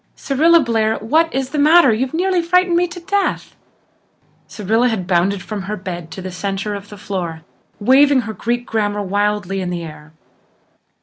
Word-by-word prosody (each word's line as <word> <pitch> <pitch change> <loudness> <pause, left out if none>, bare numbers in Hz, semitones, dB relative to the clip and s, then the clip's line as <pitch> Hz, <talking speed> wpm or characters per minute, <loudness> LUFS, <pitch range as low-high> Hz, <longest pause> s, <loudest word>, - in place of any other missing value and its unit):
Cyrilla 325 +5 +3
Blair, 225 -3 0
what 320 +9 +1
is 265 0 -3
the 300 - -2
matter? 305 -3 +6
You 250 +5 0
nearly 360 +2 +1
frightened 360 +1 +2
me 355 +1 +2
to 350 +1 -9
death!" 395 +3 -2 0.9
Cyrilla 225 +4 0
had 210 -6 -3
bounded 185 +2 +1
from 210 -2 -5
her 205 +2 -5
bed 175 -3 -7
to 180 +3 -8
the 185 - -6
centre 195 +3 -3
of 200 0 -8
the 210 - -11
floor, 175 -5 -5 0.4
waving 265 +4 +4
her 225 -2 -6
Greek 240 +4 -2
grammar 205 -2 -1
wildly 205 -1 -1
in 180 - -3
the 175 -1 -4
air. 155 -1 -11
215 Hz, 175 wpm, -18 LUFS, 190-290 Hz, 0.9 s, matter